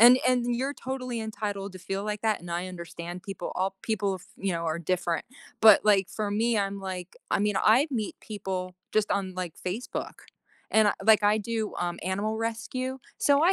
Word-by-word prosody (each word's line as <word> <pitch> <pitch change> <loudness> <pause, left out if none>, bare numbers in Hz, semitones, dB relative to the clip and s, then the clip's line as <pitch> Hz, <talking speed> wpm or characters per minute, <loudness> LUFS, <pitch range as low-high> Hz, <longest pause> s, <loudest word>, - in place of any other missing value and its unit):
and 245 +2 +10
and 245 -1 +2
you're 265 +4 -1
totally 255 -3 -4
entitled 205 -3 -4
to 185 - -9
feel 195 +2 -3
like 210 -1 -3
that, 220 -2 +2
and 175 0 -9
I 175 +2 -2
understand 175 0 -7
people 195 -3 -5
op 190 +1 0
people, 205 -3 0
of 185 - -8
you 195 -1 -1
know, 170 0 -2
are 160 +1 0
different. 170 -1 0 0.4
But 220 -3 +8
like 200 -3 +4
for 210 -2 -2
me, 225 +3 +2
I'm 200 -1 0
like 185 -1 -6 0.2
I - - +3
mean 205 -1 +1
I 245 +10 +5
meet 220 -6 -2
people 190 -4 -4 0.2
just 215 -1 +2
on 190 -2 0
like 180 -3 -4
Facebook. 220 +7 -4 0.5
And 215 -1 +5
I - - +3
like 220 -1 +6
I 210 +1 +5
do, 220 0 -2
um, 175 -1 -1
animal 205 +4 -1
rescue. 235 +3 -3 0.2
So 285 +1 +4
I 355 +3 +6
205 Hz, 200 wpm, -28 LUFS, 185-225 Hz, 0.5 s, and